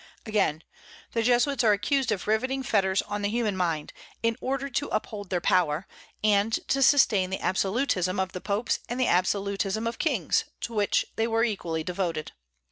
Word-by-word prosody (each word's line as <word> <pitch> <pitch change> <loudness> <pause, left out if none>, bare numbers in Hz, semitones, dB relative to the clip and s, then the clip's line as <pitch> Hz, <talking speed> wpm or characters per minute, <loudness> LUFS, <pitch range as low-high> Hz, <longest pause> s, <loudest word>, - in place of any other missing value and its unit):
Again, 195 -8 0 0.5
the 230 - 0
Jesuits 245 +2 +2
are 215 -2 +5
accused 265 +4 0
of 200 -4 -2
riveting 255 +5 0
fetters 195 -6 +1
on 205 0 -4
the 205 - 0
human 220 -2 0
mind 165 -5 -2 0.3
in 230 0 +2
order 270 +1 -2
to 280 +2 -2
uphold 205 -3 -4
their 180 - 0
power, 175 -3 +2 0.4
and 210 0 +3 0.2
to 275 - +2
sustain 220 -9 +4
the 190 - -2
absolutism 190 -1 0
of 190 0 -1
the 185 - -6
popes 205 +4 -1
and 240 +2 -3
the 255 - +3
absolutism 200 +3 0
of 230 - -3
kings, - - +1 0.2
to 235 - -4
which 205 -2 +1
they 225 - +1
were 225 0 +1
equally 175 -8 -2
devoted. 175 -3 -3
205 Hz, 175 wpm, -27 LUFS, 190-235 Hz, 0.5 s, are